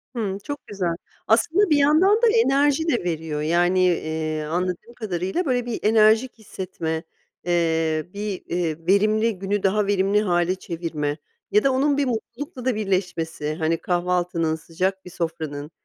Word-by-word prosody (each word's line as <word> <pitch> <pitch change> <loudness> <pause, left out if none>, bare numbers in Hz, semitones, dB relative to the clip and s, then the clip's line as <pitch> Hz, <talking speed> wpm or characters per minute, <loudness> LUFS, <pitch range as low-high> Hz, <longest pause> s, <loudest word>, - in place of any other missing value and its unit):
Hımm, 200 -4 -2
çok 285 +2 -7
güzel. 185 -5 -2 0.3
Aslında 320 - +3
bir 300 - +4
yandan 340 +10 +4
da 475 - +5
enerji 290 -4 +3
de 240 - +1
veriyor. 160 -3 -3
Yani, 175 +4 +2
eee, 155 -3 0
anladığım 180 +8 -3
kadarıyla, 195 - -2
böyle, 245 -3 0
bir 240 - -3
enerjik 220 +3 +4
hissetme, 170 -6 -5 0.4
eee, 165 -2 +1
bir, 205 -2 -4
eee, 170 -3 -1
verimli 215 +1 +2
günü 200 +1 -1
daha 200 +1 +2
verimli 200 +1 +2
hâle 175 -2 +1
çevirme 160 -5 -4 0.3
ya 210 - +4
da 275 - +3
onun 280 +2 +2
bir 285 - +2
mutlulukla 250 +2 -5
da 255 -4 +1
birleşmesi, 175 -7 -2
hani, 165 0 0
kahvaltının 175 -2 0
sıcak 185 +4 -3
bir - - -8
sofranın 160 -3 -4
190 Hz, 150 wpm, -23 LUFS, 165-230 Hz, 0.4 s, da